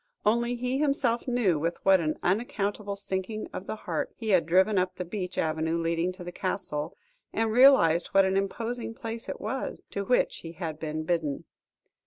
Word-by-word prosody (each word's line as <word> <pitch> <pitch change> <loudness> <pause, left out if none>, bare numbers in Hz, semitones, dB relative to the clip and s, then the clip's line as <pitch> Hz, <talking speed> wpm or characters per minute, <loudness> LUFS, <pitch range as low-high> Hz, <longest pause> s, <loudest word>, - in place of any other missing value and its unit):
Only 235 +3 +2
he 250 +2 -1
himself 275 -5 +1
knew 225 -10 +2
with 165 +3 -1
what 190 -1 +6
an 155 -2 -1
unaccountable 205 0 -1
sinking 200 +2 -3
of 190 - -6
the - - -3
heart - - -2
he 225 -2 -4
had 180 -5 +4
driven 190 +4 +4
up 185 0 -1
the 180 - -4
beech 185 0 -5
avenue 160 +1 0
leading 165 +1 0
to 180 -1 -10
the 175 - -6
Castle, 175 -4 -3 0.3
and 225 0 0
realised 225 -10 +6
what 195 0 +4
an 190 0 +1
imposing 225 +4 -2
place 230 -2 -6
it - - -4
was, - - -4
to 200 - -2
which 245 +5 +2
he 165 0 -9
had 160 -3 -5
been 155 0 -3
bidden. 155 -4 -1
190 Hz, 185 wpm, -28 LUFS, 170-225 Hz, 0.3 s, what